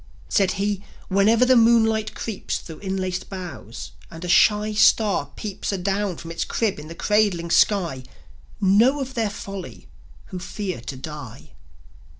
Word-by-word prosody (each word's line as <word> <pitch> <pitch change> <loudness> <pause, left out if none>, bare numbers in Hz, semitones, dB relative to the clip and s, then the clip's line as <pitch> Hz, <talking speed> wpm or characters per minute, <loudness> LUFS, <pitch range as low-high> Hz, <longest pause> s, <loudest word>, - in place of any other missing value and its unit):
Said 195 -3 +2
he: 200 0 -2 0.3
"Whenever 215 +5 +4
the 255 0 +5
moonlight 225 -2 +3
creeps 220 -4 -3
Thro' 160 -2 -10
inlaced 190 -2 -3
boughs, 180 - -8 0.2
a'nd 165 +1 -8
a - - -4
shy 210 +4 +4
star 210 -2 +3
peeps 210 -2 -4
Adown 195 -1 -1
from 165 - -8
its 165 - -2
crib 215 -8 -1
in 150 - -9
the 165 - -9
cradling 200 -5 +1
sky, 170 -12 +3 0.6
Know 220 +8 +4
of 265 -1 -4
their 225 -4 0
folly 195 -1 -8 0.4
who 185 - -5
fear 185 - -5
to 130 - -6
die." 135 -3 -9
195 Hz, 150 wpm, -23 LUFS, 175-215 Hz, 0.6 s, the